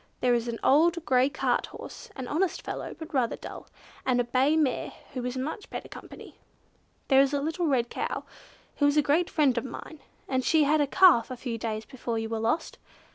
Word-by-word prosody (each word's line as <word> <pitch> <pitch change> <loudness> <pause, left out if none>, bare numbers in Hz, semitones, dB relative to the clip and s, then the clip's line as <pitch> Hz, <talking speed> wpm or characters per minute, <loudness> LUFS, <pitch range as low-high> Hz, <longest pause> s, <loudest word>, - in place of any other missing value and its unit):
There 250 -1 +3
is 240 0 0
an 235 -1 -3
old 330 +4 +4
grey 260 0 +3
cart - - 0
horse, 485 - -10
an 260 -2 -5
honest 340 +7 -1
fellow, - - -5
but 320 -1 -9
rather 250 -4 +1
dull; - - -9 0.4
and 250 -1 +2
a - - +3
bay 260 +5 +2
mare 285 -6 0 0.2
who 255 -2 -4
is 250 +1 -3
much 310 +10 -4
better - - -6
company. - - -12 0.7
There 270 -1 +6
is 275 +1 +2
a - - +1
little 325 +4 -1
red 245 -5 +1
cow - - -3 0.5
who 285 - +4
is 290 +1 +2
a 300 - +5
great 320 +5 +2
friend 285 -6 +2
of - - -7
mine, 275 +4 -8 0.3
and 260 -1 0
she 315 +1 +4
had 300 +1 +3
a 290 - +2
calf 330 -8 +5
a 255 - -6
few 235 -2 -4
days 220 -1 -3
before 240 -3 -4
you 225 0 -3
were 225 -1 -2
lost. 230 +8 -1
270 Hz, 215 wpm, -28 LUFS, 245-310 Hz, 0.7 s, There